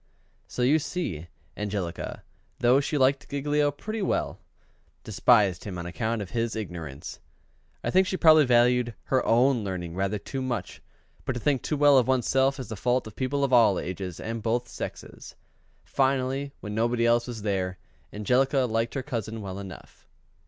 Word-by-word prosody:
So 125 - -3
you 145 +6 +4
see, 145 - -4 0.3
Angelica, 100 -5 -4 0.3
though 125 +3 +4
she 145 +2 -1
liked 135 0 +2
Giglio 145 +1 +1
pretty 215 +10 -5
well, 190 - -1 0.6
despised 105 -3 +3
him 95 -4 -6
on 85 - -5
account 110 +4 -2
of 90 - -11
his 115 -1 -1
ignorance. 85 -10 -6 0.6
I - - -1
think 190 0 +4
she 185 - -1
probably 155 -3 +7
valued 120 -1 +3 0.2
her 130 - +3
own 120 0 +3
learning 90 -4 -4
rather 95 +3 -1
too 135 +6 -5
much; 120 -8 -4 0.4
but - - -2
to 120 - -4
think 135 0 +1
too 150 - -2
well 145 -2 +6
of 125 - 0
one's 130 -2 +1
self 135 +1 +2
is 130 - -6
the 110 - -4
fault 125 +5 0
of 110 - -10
people 140 +2 -1
of 135 -2 0
all 110 -6 +6
ages 90 -1 -5
and 115 0 -4
both 120 +3 -1
sexes. - - -8 0.5
Finally, 135 +1 0
when 105 -1 -6
nobody 115 +2 +1
else 120 +1 +3
was 115 -4 -6
there, 95 -3 -1 0.3
Angelica 130 +6 +2
liked 115 0 -1
her 135 - -2
cousin 115 -5 -4
well 100 -2 -6
enough. 95 -4 -11
120 Hz, 175 wpm, -27 LUFS, 105-135 Hz, 0.6 s, probably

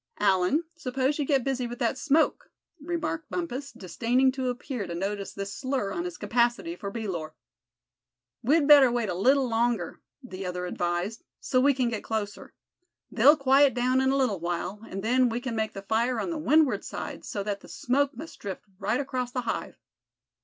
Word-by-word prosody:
"Allan, 195 - +3
s'pose 270 -1 -1
you 290 - +1
get 270 -2 +2
busy 255 -2 -1
with 240 +1 -7
that 235 +2 0
smoke," 300 +4 +1 0.3
remarked 320 -1 -3
Bumpus, 280 -5 -4
disdaining 245 +7 +1
to 260 -1 -2
appear 245 -3 -4
to 170 - -5
notice 200 +2 -3
this 200 0 -5
slur 260 -7 -2
on 345 - -3
his 355 -1 -5
capacity 240 +8 0
for 200 - -6
bee 220 +1 -5
lore. 155 -4 -4 1.1
"We'd 285 +4 +3
better 285 -4 +8
wait 235 -3 -1
a - - -1
little 260 +9 +3
longer," 230 -5 0 0.2
the 195 -6 -7
other 180 -1 -3
advised; 175 +5 -2 0.2
"so 255 -2 +1
we 280 0 +4
can 250 -2 +1
get 225 -3 -4
closer. 210 -2 -4 0.6
They'll 280 +7 +6
quiet 275 0 +4
down 255 +1 +2
in 265 - +2
a 270 - +2
little 245 -9 +1
while, 175 +4 -3
and 195 +1 -5
then 250 +2 +3
we 230 +1 -2
can 245 -2 -4
make 220 -1 -1
the 195 - -7
fire 230 +4 +1
on 340 - -2
the 325 - -3
windward 300 -8 +3
side, - - -6
so 200 - -4
that 200 -1 -3
the - - -15
smoke 270 0 0
must 320 +5 -9
drift 195 -3 -6 0.2
right 215 +6 0
across 255 -3 -3
the 250 - -2
hive." 230 - -4
245 Hz, 190 wpm, -27 LUFS, 205-275 Hz, 1.1 s, better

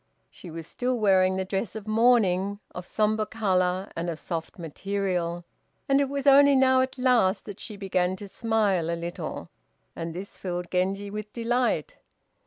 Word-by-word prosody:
She 180 - -11
was 165 0 -7
still 250 +7 -2
wearing 190 -3 +3
the 190 - -1
dress 195 +3 -3
of 215 -1 -7
mourning, 210 -4 +3
of 180 0 -7
sombre 215 0 +1
color 185 -3 0
and 170 +1 -2
of 165 -1 -5
soft 165 -2 -5
material, 175 0 -3 0.4
and 275 0 +4
it 275 - 0
was 280 0 -3
only 280 0 +7
now 260 -1 +5
at 260 +1 -2
last 240 -7 +2
that 205 -2 -8
she 210 -3 -7
began 185 -2 0
to 200 +2 -9
smile 205 -6 0
a 170 - -1
little, 170 +1 -6 0.4
and 165 0 -5
this 190 +3 -8
filled 175 -2 -4
Genji 195 +2 -1
with 210 0 -6
delight. 245 - 0
200 Hz, 170 wpm, -26 LUFS, 180-230 Hz, 0.4 s, only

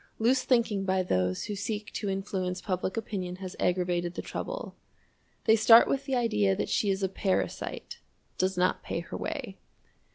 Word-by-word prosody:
Loose 250 +4 +3
thinking 225 -6 +2
by 190 -1 +1
those 90 - 0
who 210 - -4
seek 210 +1 -4
to 205 - -2
influence 190 -2 -2
public 185 +1 -2
opinion 190 -5 -3
has 185 -1 -7
aggravated 175 -1 0
the - - -3
trouble. - - -5 0.7
They 220 - +5
start 225 +2 +8
with 275 0 -1
the 270 -2 -1
idea 210 -5 +2
that - - -2
she 205 - +1
is 195 0 0
a - - +3
parasite 190 0 -2 0.4
does 185 0 +1
not 180 +1 +2
pay - - -3
her - - -8
way. - - -5
195 Hz, 170 wpm, -29 LUFS, 185-220 Hz, 0.7 s, start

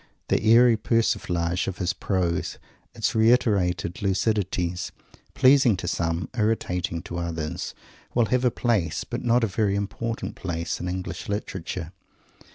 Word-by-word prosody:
The - - +2
airy 115 +1 +6
persiflage 90 -6 0
of 95 - -3
his 90 -2 0
prose 90 -2 -1 0.4
its - - 0
reiterated 100 -7 +2
lucidities 95 -3 0 0.5
pleasing 130 -5 +5
to 90 - -5
some, 85 +1 -1
irritating 90 -6 -1
to 85 -2 -5
others, 85 0 -4 0.4
will 120 -1 +4
have 125 +3 +1
a 125 - +5
place, 110 -9 0
but - - -5
not 120 0 +3
a - - +3
very 100 0 0
important 115 +3 -3
place, 85 -2 -3
in 90 - -4
English 90 0 -5
Literature. 95 -5 -4
95 Hz, 135 wpm, -25 LUFS, 85-115 Hz, 0.5 s, airy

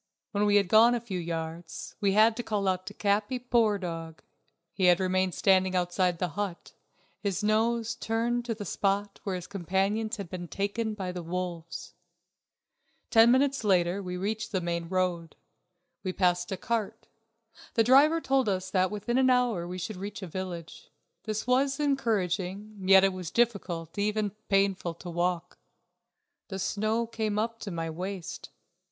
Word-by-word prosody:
When 210 0 +1
we 205 - +4
had 200 -2 +4
gone 225 +5 +6
a - - 0
few 210 -6 -5
yards 165 0 -5
we 200 -1 +3
had 220 +2 +5
to - - -1
call 200 -5 0
to 185 0 -10
Capi. 205 +5 +1
Poor 235 -4 +2
dog, 165 -3 -6 0.5
he 190 - +1
had 180 0 +6
remained 185 -1 +1
standing 190 -1 +3
outside 180 0 +1
the 180 +1 -1
hut, 195 +1 -5 0.5
his 200 0 -2
nose 225 +2 +1
turned 235 +1 -1
to 230 -2 -2
the 205 -1 -6
spot 200 +2 -1
where 195 -2 -2
his 180 -1 -5
companions 200 +4 -1
had 200 -3 -5
been 175 0 -6
taken 210 +4 -2
by 190 -3 -4
the 180 0 -5
wolves. 170 -1 -5 1.2
Ten 225 +1 +7
minutes 275 +1 +3
later 185 -1 +2
we 180 -1 -5
reached 215 +4 -3
the 190 - 0
main 170 -1 -3
road. 180 -3 -1 0.7
We 185 -2 -3
passed 180 -1 +1
a 190 - -2
cart; 225 +1 -3 0.7
the 225 - +5
driver 280 +7 +6
told 265 -6 +1
us 185 -1 -2
that 185 -1 +2
within 210 +4 -1
an 260 0 +4
hour 245 -9 +2
we 180 +1 -5
should 185 +3 -5
reach 200 +1 -6
a - - -5
village. 175 -1 -7 0.4
This 215 -1 -2
was 270 +3 +2
encouraging, 210 - -1
yet 190 0 +8
it 195 -1 +3
was 180 -3 -5
difficult, 185 -9 -1
even 210 0 0 0.2
painful, 195 -3 +1
to 175 +1 -8
walk. 175 0 -2 0.9
The 190 - -5
snow 215 +4 0
came 220 -2 -2
up 230 +1 -1
to 210 - -6
my 165 -2 -3
waist. 185 +2 -6
195 Hz, 165 wpm, -28 LUFS, 180-220 Hz, 1.2 s, yet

